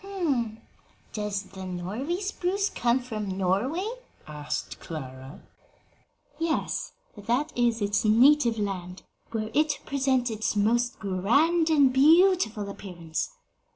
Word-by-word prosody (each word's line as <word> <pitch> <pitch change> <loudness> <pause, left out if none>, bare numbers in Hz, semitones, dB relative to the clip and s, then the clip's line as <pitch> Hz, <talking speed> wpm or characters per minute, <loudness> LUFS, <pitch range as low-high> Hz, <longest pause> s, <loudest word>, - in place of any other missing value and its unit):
"Does 210 -2 -2
the 190 0 -10
Norway 205 - -3
spruce 395 0 -1
come 240 +2 +1
from 215 -6 -4
Norway?" 225 - 0 0.4
asked 150 -1 -5
Clara. 130 -3 -8 1.0
"Yes; 330 -1 -1 0.2
that 240 +9 -1
is 235 -3 +1
its 205 +1 +1
native 235 +2 +5
land, 185 -3 -4 0.3
where 220 -1 -3
it 300 0 +2
presents 260 -3 +1
its 220 0 -2
most 235 +4 +1
grand 280 - +2
and 285 -5 +4
beautiful 300 - +4
appearance. 175 -5 -5
225 Hz, 105 wpm, -27 LUFS, 195-285 Hz, 1.0 s, native